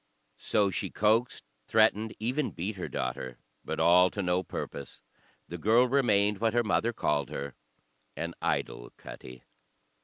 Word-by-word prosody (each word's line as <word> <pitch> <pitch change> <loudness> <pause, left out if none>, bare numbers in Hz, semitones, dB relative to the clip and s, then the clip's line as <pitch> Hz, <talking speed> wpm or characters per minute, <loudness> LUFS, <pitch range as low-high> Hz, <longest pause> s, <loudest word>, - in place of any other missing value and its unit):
So 100 -2 +1
she - - -3
coaxed, 110 +4 +1 0.2
threatened, 110 0 +2
even 130 +6 -1
beat 95 +5 -4
her 90 - -5
daughter, 65 0 -4 0.3
but - - -4
all 90 +2 +6
to 100 - -4
no 90 0 +1
purpose; 70 -5 -7 0.5
the 85 - -7
girl 115 +7 +4
remained 105 -6 +2
what 115 0 +1
her 120 - +3
mother 110 +2 +1
called 75 - -1
her, 70 -1 -5 0.6
"an 85 +1 -4
idle - - -2
cuttie." 60 -1 -11
100 Hz, 145 wpm, -29 LUFS, 85-110 Hz, 0.6 s, all